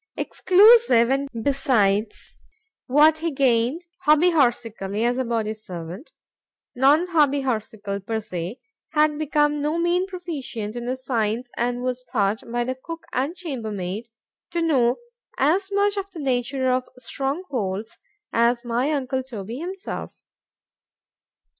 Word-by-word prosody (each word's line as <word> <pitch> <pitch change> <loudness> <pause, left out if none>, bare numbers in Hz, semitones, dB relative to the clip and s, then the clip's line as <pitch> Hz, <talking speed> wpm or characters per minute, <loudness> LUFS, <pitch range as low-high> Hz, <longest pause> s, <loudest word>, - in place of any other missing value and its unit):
exclusive 380 - +5
and 275 +1 0
besides 225 -7 +1 0.5
what 300 +4 +5
he 335 +1 -1
gained 265 +3 +1 0.2
HOBBY 310 +4 +6
HORSICALLY, 230 - 0
as 245 +2 +1
a - - +1
body 225 -3 -1
servant, 185 - -9 0.6
Non 280 +7 +4
Hobby 290 -4 +3
Horsical 215 -5 -3
per 220 +2 -2
se;——had 255 - -2
become 295 -1 +1
no 300 +3 0
mean 350 +2 +1
proficient 290 - -5
in 240 0 -5
the 255 - 0
science; 240 -2 -2
and 245 +1 -1
was 255 0 -2
thought, 210 -2 +1
by 240 0 0
the 255 +2 -2
cook 330 +6 -9
and 280 +7 -1
chamber 270 -12 -5
maid, 200 +4 -4 0.4
to 340 -1 -1
know 255 -7 +3 0.4
as 360 +8 +2
much 405 +1 +2
of 395 0 -3
the 355 -4 -10
nature 260 -1 0
of 255 0 -1
strong 275 +6 -3
holds 215 -2 -3 0.3
as 235 +1 +2
my 240 +4 0
uncle 265 -3 -1
Toby 230 -3 -7
himself. 370 +4 -6
260 Hz, 135 wpm, -23 LUFS, 230-305 Hz, 0.6 s, HOBBY